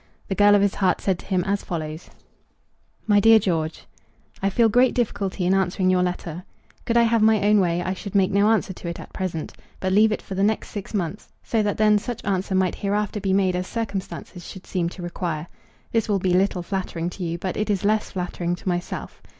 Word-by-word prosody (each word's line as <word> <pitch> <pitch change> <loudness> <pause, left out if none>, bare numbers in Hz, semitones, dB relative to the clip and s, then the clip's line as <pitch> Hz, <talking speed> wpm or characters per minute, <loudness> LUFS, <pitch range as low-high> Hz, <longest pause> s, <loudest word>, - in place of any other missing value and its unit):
The - - 0
girl 205 +1 +5
of 200 - +4
his 200 - +2
heart 185 -3 +1
said 190 -3 0
to - - -12
him 185 -2 +1
as 200 +2 -1
follows: 155 -2 -5 1.0
MY 205 -2 +4
DEAR 225 +2 +7
GEORGE, 165 -6 -1 0.6
I 195 - +2
feel 230 +4 +3
great 245 +4 +3
difficulty 200 -6 -1
in 185 - +3
answering 185 -1 +1
your 180 0 +3
letter. 180 -1 -3 0.4
Could 235 - +2
I 235 - +6
have 230 -1 +2
my 220 0 +5
own 210 0 +5
way, 175 -2 +1
I 185 - -1
should 200 +1 -8
make 195 -1 +3
no 200 +2 +4
answer 215 -3 +1
to 175 - -9
it 170 - -5
at - - -11
present, 175 -4 -4 0.3
but 185 0 -1
leave 215 +2 +5
it 210 - -2
for - - -7
the 190 - -1
next 210 +2 +1
six 205 +1 -6
months, 190 +1 -3
so 225 - 0
that 205 -1 -1
then 210 -1 +4
such 240 +2 -6
answer 190 -1 -1
might 185 -1 +2
hereafter 205 +1 -1
be 195 -1 -1
made 190 -1 +2
as 180 +1 -2
circumstances 200 -5 -5
should 190 +2 -10
seem 175 -3 -1
to 180 - -9
require. 170 -3 -3 0.5
This 225 -1 0
will 205 - +3
be 185 -1 0
little 185 -1 +2
flattering 175 -2 -3
to 185 - -7
you, 170 0 -2
but 185 +1 -4
it 215 +1 -2
is 200 -1 0
less 215 +1 +1
flattering 180 -1 -3
to 175 - -13
myself. 175 -1 -3
190 Hz, 225 wpm, -23 LUFS, 180-210 Hz, 1.0 s, DEAR